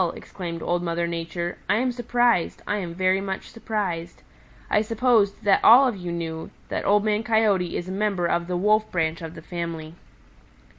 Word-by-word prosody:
exclaimed 170 -3 -7
Old 175 0 0
Mother 170 0 -1
Nature, 170 +1 -4
"I 200 - +4
am 250 +3 +1
surprised. 240 -5 +1
I 205 - -1
am 175 -4 -5
very 185 +1 +2
much 195 -1 -5
surprised. 195 - -4 0.4
I 210 - +2
supposed 225 -2 +2
that 200 -1 +3
all 260 +4 +8
of 240 - -1
you 180 -2 -5
knew 165 -1 -4 0.2
that - - -2
Old 205 0 +4
Man 210 0 +1
Coyote 215 -6 +1
is 175 - -5
a - - -5
member 195 -2 0
of 170 0 0
the 180 -1 -1
Wolf 215 +3 +2
branch 165 -1 -1
of 165 0 -7
the 165 - -10
family." 165 -2 -5
185 Hz, 185 wpm, -24 LUFS, 170-215 Hz, 0.4 s, all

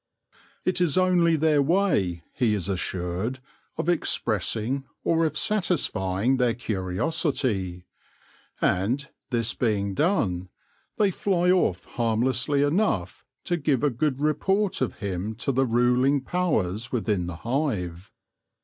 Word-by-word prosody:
It 185 0 +1
is 175 -2 +2
only 180 -3 +4
their 155 -1 +3
way, 140 - +1
he 120 -7 +1
is 95 -5 -3
assured, 95 +4 -2 0.4
of - - -2
expressing 120 - 0 0.2
or 165 0 +2
of 150 0 -4
satisfying 135 - +1
their 125 -3 +2
curiosity; 100 - -1 0.7
and, 120 +10 +1 0.2
this 120 -1 0
being 100 -4 0
done, 95 - 0 0.5
they 205 -2 +3
fly 180 -1 +1
off 175 - +1
harmlessly 125 +4 +1
enough 145 - 0 0.2
to 175 - 0
give 145 -4 0
a 145 - +3
good 135 +2 -1
report 190 +7 +1
of 130 - -1
him 100 +2 -4
to 130 - -1
the 135 0 +1
ruling 125 +4 +3
powers 120 - -1
within 105 -7 0
the 90 - -5
hive. 100 - -2
125 Hz, 120 wpm, -25 LUFS, 100-155 Hz, 0.7 s, only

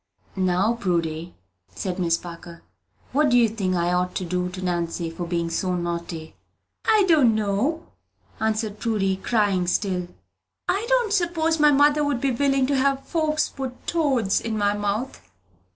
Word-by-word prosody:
"Now, 190 +3 +2
Prudy," 170 -6 -2 0.4
added 185 -1 -3
Miss 165 -2 +2
Parker, 170 -1 -10 0.5
"what 295 +2 +3
do 245 - +4
you 235 -2 +5
think 200 -4 -2
I 175 0 +1
ought 180 0 0
to 185 - -2
do 180 +1 -1
to 185 +1 -8
Nancy 170 -1 -2
for 170 +1 -5
being 170 -1 -1
so 180 +2 -1
naughty?" 170 -2 -4 0.5
"I 430 -3 +4
don't 280 -10 +5
know," 220 +11 0 0.5
answered 220 -1 -1
Prudy, 200 -5 0
crying 195 -3 +1
still. 180 -1 0 0.6
"I 405 +5 0
don't - - +2
s'pose 330 -4 +1
my 300 0 +6
mother 290 +1 +4
would 285 -4 0
be 270 +1 +1
willing 275 +1 +2
to 280 +1 0
have 275 0 +1
folks 310 -2 0
put 260 -2 -7
toads 270 - +1
in 225 -1 -3
my 205 -1 +2
mouth." 205 +5 -3
210 Hz, 160 wpm, -24 LUFS, 180-275 Hz, 0.6 s, my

